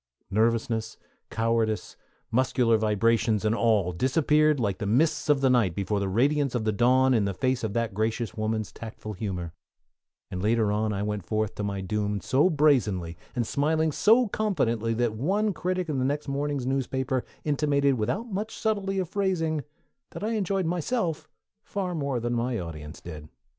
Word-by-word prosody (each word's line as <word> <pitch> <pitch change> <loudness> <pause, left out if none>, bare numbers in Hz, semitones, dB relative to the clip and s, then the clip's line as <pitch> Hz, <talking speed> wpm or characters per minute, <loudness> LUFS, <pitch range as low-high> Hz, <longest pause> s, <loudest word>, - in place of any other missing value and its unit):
Nervousness, 115 +2 0 0.3
cowardice, 115 -1 0 0.4
muscular 125 -1 +3
vibrations, 110 0 +2
and 110 - +3
all 110 -6 +2
disappeared 150 - +2
like 100 -5 -1
the 105 - -2
mists 150 +9 +2
of 145 -2 +4
the 135 - +4
night 110 -9 +2
before 100 +1 -1
the 100 -1 -1
radiance 140 +5 +1
of 120 - 0
the 110 - +1
dawn 130 +4 +4
in 110 -4 +2
the 100 -1 -2
face 130 +3 0
of 110 -3 -2
that 115 -3 -1
gracious 110 +1 -1
woman's 110 -1 -2
tactful 110 -1 -8
humor, 90 -4 -4 0.8
and 90 - -4
later 110 0 +2
on 105 +1 0
I 100 0 -2
went 105 -2 -2
forth 110 +2 -1
to 105 - -5
my 100 -1 -2
doom 105 +1 -1
so 140 - +3
brazenly, 120 - +2 0.2
and 120 - 0
smiling 155 +5 +1
so 225 - +4
confidently, 120 - 0
that 120 -1 0
one 195 - 0
critic 185 0 -2
in 145 -4 -1
the - - +1
next 145 +2 -1
morning's 140 -1 -2
newspaper 130 -1 -1 0.2
intimated 140 -2 +2
without 125 - -1
much 215 0 -4
subtlety 200 -3 -1
of 185 -2 0
phrasing 165 -5 0 0.5
that - - -6
I 220 - 0
enjoyed 195 -4 0
myself 175 - -1 0.3
far 190 -3 -3
more 140 -6 -1
than 120 +1 -2
my 120 0 -1
audience 80 -4 -7
did. 75 -3 -9
120 Hz, 170 wpm, -27 LUFS, 110-150 Hz, 0.8 s, of